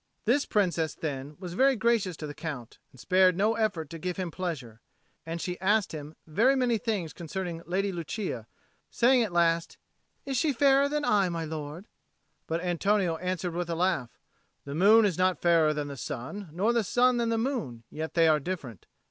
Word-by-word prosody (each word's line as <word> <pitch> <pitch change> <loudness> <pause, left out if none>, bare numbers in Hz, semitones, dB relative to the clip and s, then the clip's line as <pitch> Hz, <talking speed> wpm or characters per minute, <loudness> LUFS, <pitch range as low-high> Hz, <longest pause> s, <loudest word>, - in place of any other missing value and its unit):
This 265 +6 +2
Princess, 175 -6 +1
then, 145 -1 -5
was 180 -2 -6
very 265 +7 +4
gracious 220 -7 +1
to 155 - -6
the 145 - -6
Count, 140 -8 -7
and 130 - -18
spared 185 +3 +4
no 210 +3 +3
effort 205 -9 -1
to 165 - -7
give 180 +1 -3
him 185 -3 -3
pleasure; 140 -12 -5 0.5
and 165 +1 -3
she 180 0 -4
asked 205 +2 +2
him 150 0 -8
very 230 - +3
many 245 -4 +1
things 205 -9 -2
concerning 175 0 -5
the 170 - -17
Lady 195 +2 0
Lucia, 170 - -4 0.4
saying 250 +1 +4
at 220 -5 -1
last, 170 -1 +1 0.5
"Is 270 -2 -2
she 295 +3 +2
fairer 275 +2 +4
than 295 0 -1
I, 200 -3 +3
my 165 -1 -3
lord?" 155 +4 -6 0.6
But 165 +1 -1
Antonio 180 0 +1
answered, 180 -1 -3
with 175 0 -3
a 165 - -1
laugh, 170 -8 -1 0.5
"The 140 - -6
moon 210 +7 +6
is 185 -4 0
not 185 0 +2
fairer 165 -3 +4
than 150 -1 -3
the 140 - -6
sun, 165 +12 -6
nor 200 +9 +1
the 235 -2 +2
sun 245 +4 +3
than 235 -1 0
the 230 - +1
moon: 225 - -3
yet 160 +1 -5
they 165 -1 +5
are 155 -1 +4
different." 140 - -6
180 Hz, 195 wpm, -28 LUFS, 160-215 Hz, 0.6 s, moon